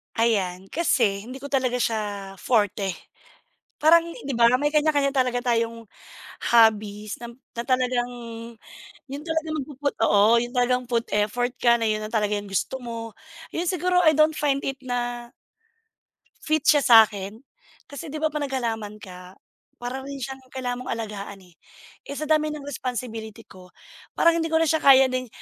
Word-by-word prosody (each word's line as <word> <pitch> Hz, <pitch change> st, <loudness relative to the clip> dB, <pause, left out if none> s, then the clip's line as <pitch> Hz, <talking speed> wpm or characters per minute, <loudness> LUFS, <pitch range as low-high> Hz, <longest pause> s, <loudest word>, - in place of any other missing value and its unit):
Ayan, 195 Hz, -5 st, 0 dB
kasi 230 Hz, -11 st, +1 dB
hindi 260 Hz, +2 st, -9 dB
ko 285 Hz, -, -7 dB
talaga 255 Hz, -3 st, +1 dB
siya 230 Hz, -3 st, 0 dB, 0.4 s
forte. 205 Hz, -4 st, +1 dB, 0.9 s
Parang 330 Hz, +2 st, +6 dB, 0.2 s
di 275 Hz, -, -2 dB
ba, 235 Hz, -1 st, +5 dB
may 295 Hz, +1 st, +1 dB
kanya-kanya 295 Hz, -2 st, +2 dB
talaga 250 Hz, -2 st, +1 dB
tayong 230 Hz, -1 st, 0 dB, 0.7 s
hobbies 215 Hz, -2 st, +3 dB
nam 235 Hz, +1 st, -10 dB, 0.2 s
na 235 Hz, -, -3 dB
talagang 250 Hz, -2 st, +1 dB, 1.0 s
yun 280 Hz, +1 st, -6 dB
talagang 320 Hz, -1 st, -2 dB
magpuput, 280 Hz, 0 st, -4 dB
oo, 210 Hz, +3 st, +5 dB
yun 240 Hz, 0 st, -4 dB
talagang 250 Hz, 0 st, +2 dB
put 235 Hz, -1 st, 0 dB
effort 230 Hz, +4 st, 0 dB
ka 235 Hz, -1 st, +5 dB
na -, -, -2 dB
yun 215 Hz, 0 st, 0 dB
na -, -, -4 dB
talaga 210 Hz, -2 st, +1 dB
yung 205 Hz, -, -9 dB
gusto 230 Hz, +7 st, -1 dB
mo. 230 Hz, -1 st, -6 dB, 0.4 s
Yun 345 Hz, +2 st, -1 dB
siguro, 360 Hz, 0 st, +1 dB
I 315 Hz, -, +6 dB
don't 310 Hz, +1 st, +5 dB
find 275 Hz, -2 st, 0 dB
it 270 Hz, 0 st, -4 dB
na 240 Hz, -1 st, -3 dB, 1.1 s
fit 310 Hz, -2 st, 0 dB
siya 290 Hz, -2 st, +5 dB
sakin. 220 Hz, -4 st, +5 dB, 0.5 s
Kasi, 295 Hz, +3 st, -8 dB
di 310 Hz, -, -4 dB
ba, 315 Hz, -, +2 dB
'pag 300 Hz, -1 st, -3 dB
naghalaman 225 Hz, -5 st, -3 dB
ka, 180 Hz, -1 st, -12 dB, 0.4 s
para 245 Hz, +2 st, -5 dB
rin 280 Hz, +1 st, -7 dB
siyang 265 Hz, 0 st, -6 dB
kailangan 250 Hz, -2 st, -3 dB
mong -, -, -3 dB
alagaan, 205 Hz, -3 st, -6 dB
eh. 180 Hz, -1 st, -21 dB, 0.5 s
Eh, 280 Hz, -, -6 dB
sa 305 Hz, -, -4 dB
dami 310 Hz, 0 st, +2 dB
ng 300 Hz, -1 st, -5 dB
responsibility 240 Hz, -5 st, -5 dB
ko, 185 Hz, -1 st, -16 dB, 0.5 s
parang 335 Hz, 0 st, +4 dB
hindi 325 Hz, -, -1 dB
ko 320 Hz, -, -1 dB
na 325 Hz, -, +3 dB
siya 315 Hz, +1 st, +2 dB
kaya 270 Hz, -2 st, +7 dB
din 255 Hz, 0 st, -2 dB
245 Hz, 165 wpm, -24 LUFS, 220-285 Hz, 1.1 s, kaya